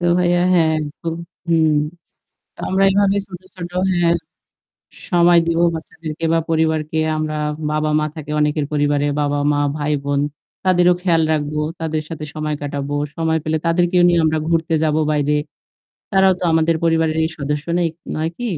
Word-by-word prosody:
তো 175 - -1
ভাইয়া 175 0 +2
হ্যাঁ 165 -3 +4
একদম। 155 +2 -5 0.3
হুম। 160 -2 +3 0.8
তো - - -33
আমরা 190 +1 +2
এভাবে 200 0 +2
ছোট, 180 -2 -10 0.2
ছোট 175 -1 -6 0.2
হ্যাঁ 170 -1 +2 1.0
সময় 175 -1 +5
দিব 165 0 +1 0.2
বাচ্চাদেরকে 160 0 -7
বা - - +3
পরিবারকে 160 -1 0 0.2
আমরা 155 0 -2 0.4
বাবা-মা 155 0 +1
থাকে 155 -2 -8
অনেকের 150 0 +1
পরিবারে। 145 -1 +1
বাবা-মা, 145 0 +1 0.2
ভাই-বোন। 145 -1 -1 0.4
তাদেরও 180 -1 +4
খেয়াল 170 -3 +3
রাখবো। 150 0 -1 0.2
তাদের 160 -1 -2
সাথে 160 -2 -6
সময় 155 -1 -2
কাটাবো। 145 0 -3 0.2
সময় 160 -1 +1
পেলে 155 0 0
তাদেরকেও 175 +1 +3
নিয়েও 170 -1 +3
আমরা 155 0 +1
ঘুরতে 165 0 +1
যাবো 155 0 +1
বাইরে। 150 -1 +1 0.8
তারাও 190 0 +4
তো - - -2
আমাদের 160 0 +2
পরিবারেরই 160 -1 +2
সদস্য 150 +1 -3
নাই 175 -1 +2 0.3
নয় 160 +1 -1
কি? 245 - -4
160 Hz, 150 wpm, -19 LUFS, 150-170 Hz, 1.0 s, সময়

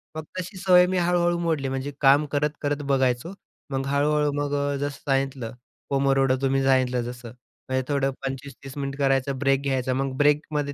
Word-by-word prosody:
मग 155 - -4 0.2
तशी 185 +2 -6
सवय 180 -1 +5
मी 185 - -1
हळू-हळू 175 0 +2
मोडली 160 -5 -1
म्हणजे 135 +2 -3
काम 140 +2 +5
करत 150 +1 +1
करत 145 0 -1
बघायचो 130 +5 +1 0.4
मग 135 0 -1
हळू-हळू 150 +1 +2
मग 145 0 -2
अ, 140 0 0
जसं 145 0 -4
सांगितलं 135 -3 -1 0.4
पोमोडोरो 135 -1 +2
तुम्ही 135 0 +1
सांगितलं 130 -2 +2
जसं. 120 -1 -7 0.4
म्हणजे 130 0 0
थोडं 140 -2 +1
25-30 135 0 -7
मिनिट 140 -1 -3
करायचं 135 -1 +1
ब्रेक 135 0 +2
घ्यायचा 130 -2 -1
मग 135 0 -2
ब्रेकमध्ये 145 0 +1
140 Hz, 170 wpm, -25 LUFS, 135-145 Hz, 0.4 s, सवय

